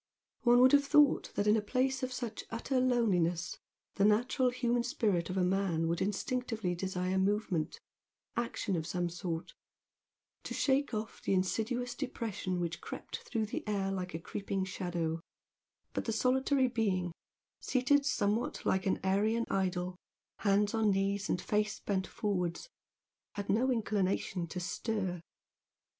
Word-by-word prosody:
One 245 -1 +6
would 255 0 +7
have 285 0 +6
thought 290 0 +4
that 205 - +1
in 210 +1 +5
a 220 - +2
place 260 +5 0
of 255 0 -2
such 240 -3 -4
utter 255 +3 -1
loneliness, 185 -9 +1 0.4
the 200 - +3
natural 245 +5 +3
human 245 -1 +1
spirit 210 -8 0
of 185 - -2
a 185 - +3
man 180 -3 +1
would 170 +1 0
instinctively 220 -1 -1
desire 185 +1 -1
movement, 190 -5 0 0.6
action 230 -4 -1
of 160 -1 -2
some 175 0 -1
sort, 170 -1 -4 0.9
to - - -5
shake 275 +1 +2
off 215 +1 -5
the 195 - +1
insidious 235 +6 0
depression 230 -8 -3
which 170 -1 -3
crept - - -6
through 225 -4 -2
the 210 - -4
air 195 -2 0
like 180 -3 -3
a - - -3
creeping 195 +2 -3
shadow, 175 -4 -2 0.7
but - - -2
the 225 - 0
solitary 260 +3 +2
being, 200 -7 0 0.5
seated 275 +3 +2
somewhat 230 -5 0
like 190 0 +1
an 190 - +1
Aryan 215 +5 +2
idol, 180 -1 -1 0.4
hands 205 0 +2
on 220 -2 +3
knees 195 +1 0
and - - +1
face 210 +2 0
bent 190 -2 -1
forwards, 195 - -2 0.7
had 205 -1 -4
no 240 +6 +3
inclination 195 -5 0
to 180 - -5
stir. 180 0 -2
205 Hz, 150 wpm, -32 LUFS, 185-240 Hz, 0.9 s, would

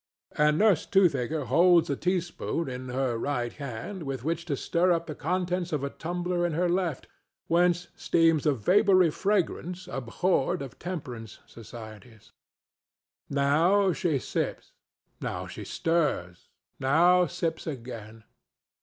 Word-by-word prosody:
And 150 0 +3
Nurse 205 -6 +3
Toothaker 155 -6 +2
holds 170 +7 +5
a 140 - -1
teaspoon 175 -1 -2
in 130 0 -6
her 125 -2 -1
right 120 -3 -2
hand 140 - -6
with 135 -5 -4
which 165 +2 -2
to 145 -5 -2
stir 175 +6 +1
up 170 -1 +1
the 155 - -5
contents 180 +3 -2
of 150 -3 -1
a 140 - -2
tumbler 175 +1 -2
in 175 -2 0
her 175 +3 +1
left, 175 -5 -1 0.4
whence 175 +1 +2
steams 165 -3 +2
a 150 - +4
vapory 185 - +4
fragrance 180 -1 -1
abhorred 135 +2 0
of 135 - -10
temperance 125 - -6
societies. 110 0 -12 1.0
Now 165 +8 +3
she 165 -5 0
sips, - - -3 0.5
now - - -4
stirs, 150 - -2 0.3
now 175 +6 +4
sips 165 -1 -3
again. 115 -5 -7
160 Hz, 125 wpm, -27 LUFS, 130-180 Hz, 1.0 s, holds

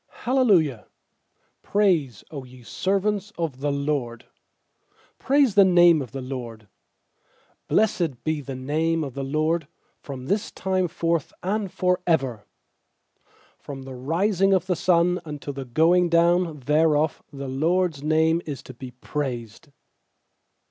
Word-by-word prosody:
j. 245 - -1
_L 255 -8 +5
ci 135 -9 -3 0.8
praise^ 170 - +1
Q 140 -4 -6
ye 125 -1 -15
servants 200 - -1
of 160 -6 -3
the 145 +1 -1
LORD, 140 -5 -2 0.9
Praise 275 -4 +3
the 200 - +7
name 175 -4 +5
of 125 -5 -7
the 135 -1 -6
LORD. 120 -5 -7 1.0
^Blessed 175 - +1
be 155 -1 -1
the 135 -1 -7
name 155 +5 -1
of 135 -4 -6
the 140 - -4
LORD 155 +3 0 0.3
From 130 -3 -8
this 200 +7 -1
time 185 -1 -1
forth 165 -2 -1
and 200 0 -1
for 180 0 +1
ever. 135 -10 0 1.2
3From 135 -2 -8
the 135 - -8
rising 185 +9 +1
of 185 -1 0
the 185 -1 0
sun 180 +1 +2
unto 150 -2 -6
the 135 -1 -6
going 170 +7 +3
down 170 -2 +2
thereof 150 +2 +2
The 140 -1 -7
LORD'S 160 +3 0
name 160 +2 +2
is 145 -3 -5
to 130 - -11
be 130 +1 -9
praised. 125 0 -5
155 Hz, 140 wpm, -24 LUFS, 135-180 Hz, 1.2 s, the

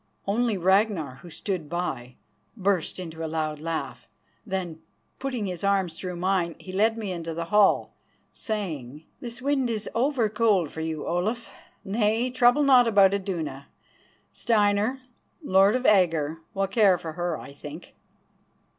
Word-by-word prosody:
Only 220 +1 +1
Ragnar, 190 - +2
who 170 +6 -13
stood 170 -2 -4
by, 135 -8 -4 0.4
burst 190 -4 0
into 165 -2 -6
a - - -2
loud 155 -1 -2
laugh. 165 0 -4 0.4
Then, 180 -5 -4 0.4
putting 255 -5 -3
his 180 -2 -5
arm 200 -2 +2
through 180 +2 -6
mine, 180 -1 0
he 185 - -10
led 220 +4 +2
me 210 -4 -4
into 165 -2 -5
the 170 0 -3
hall, 210 -2 +4 0.4
saying: 160 - -5
"This 245 0 -8
wind 275 -3 +1
is 220 -2 -3
over 250 -1 +1
cold 210 -7 +2
for 160 - -6
you, 160 -2 -3
Olaf. 215 +8 -2 0.3
Nay, 220 +4 +1
trouble 250 +3 +4
not 255 -4 +6
about 200 -3 +5
Iduna. 165 -9 -3 0.7
Steinar, 215 +3 +1 0.4
Lord 195 -3 +4
of 255 0 -2
Agger, 165 -6 +3 0.2
will 195 0 +1
care 195 -2 +4
for 160 -2 -7
her, 175 -1 -2
I 140 - -10
think." 150 +4 -10
190 Hz, 145 wpm, -26 LUFS, 165-220 Hz, 0.7 s, not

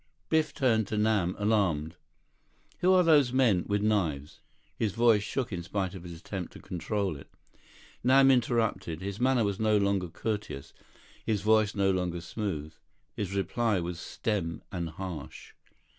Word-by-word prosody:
Biff 160 -1 +2
turned 115 -8 +1
to 105 - -3
Nam, 105 -4 +2
alarmed. 95 -7 +1 0.8
"Who 185 - +4
are 185 -1 +6
those 150 -6 +5
men—with 105 -5 +2
knives—" 80 -10 0 0.4
His 105 -4 -1
voice 115 -2 +4
shook 120 +2 -3
in 90 - -3
spite 95 +1 -3
of 95 - -8
his 85 -1 -9
attempt 95 0 -6
to - - -11
control 95 +1 -2
it. 70 - -14 0.7
Nam 135 +2 +6
interrupted. 115 -9 0
His 100 +2 -5
manner 130 -1 +3
was 100 -2 -1
no 110 -1 +3
longer 100 -3 +1
courteous, 105 -7 -4 0.5
his 105 -3 0
voice 110 -1 +3
no 100 -1 +3
longer 90 -2 -1
smooth. 85 -4 -4 0.4
His 100 -1 -3
reply 110 +1 +1
was 85 0 -4
stem 90 -5 -3
and 85 -2 -3
harsh. 80 -3 -8
100 Hz, 150 wpm, -29 LUFS, 90-110 Hz, 0.8 s, are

